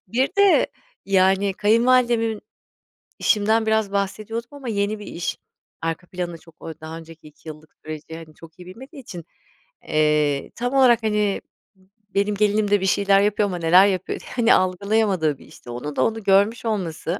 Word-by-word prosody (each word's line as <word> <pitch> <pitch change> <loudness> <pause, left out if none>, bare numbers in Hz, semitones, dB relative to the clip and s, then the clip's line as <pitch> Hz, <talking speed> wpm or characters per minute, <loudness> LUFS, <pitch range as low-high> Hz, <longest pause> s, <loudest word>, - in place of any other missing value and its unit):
Bir 255 +7 +1
de 400 -1 +5 0.4
yani 195 +1 +2
kayınvalidemin, 230 0 +2 0.8
işimden 220 +1 +2
biraz 220 -2 +1
bahsediyordum 215 +4 -3
ama 280 -3 -10
yeni 205 0 -1
bir 205 - -10
iş 170 - -4 0.4
arka 165 +2 -4
planı, 175 -2 -5
çok 165 0 -20
o 160 -1 -9
daha 160 +1 -7
önceki 165 -1 -13
2 150 +1 -13
yıllık 155 0 -12
süreci 155 +1 -8
hani 160 -1 -11
çok 165 +2 -16
iyi 180 - -11
bilmediği 265 - -12
için, 180 -10 -10 0.6
eee, 150 -2 +1
tam 245 +3 -3
olarak 245 -4 +4
hani 210 -2 0 0.3
m 190 0 -28 0.3
benim 200 +1 +1
gelinim 210 0 +1
de 205 -2 +3
bir - - -1
şeyler 195 +1 +3
yapıyor 205 0 +1
ama 180 - -4
neler 175 +4 +5
yapıyor, 190 -1 -2 0.2
hani 240 -1 +4
algılayamadığı 185 -4 +1
bir - - -17
işti. - - -15
Onun 125 +5 -6
da - - +2
onu 225 -1 -2
görmüş 200 +5 +2
olması, 180 -4 -3
200 Hz, 170 wpm, -22 LUFS, 165-220 Hz, 0.8 s, de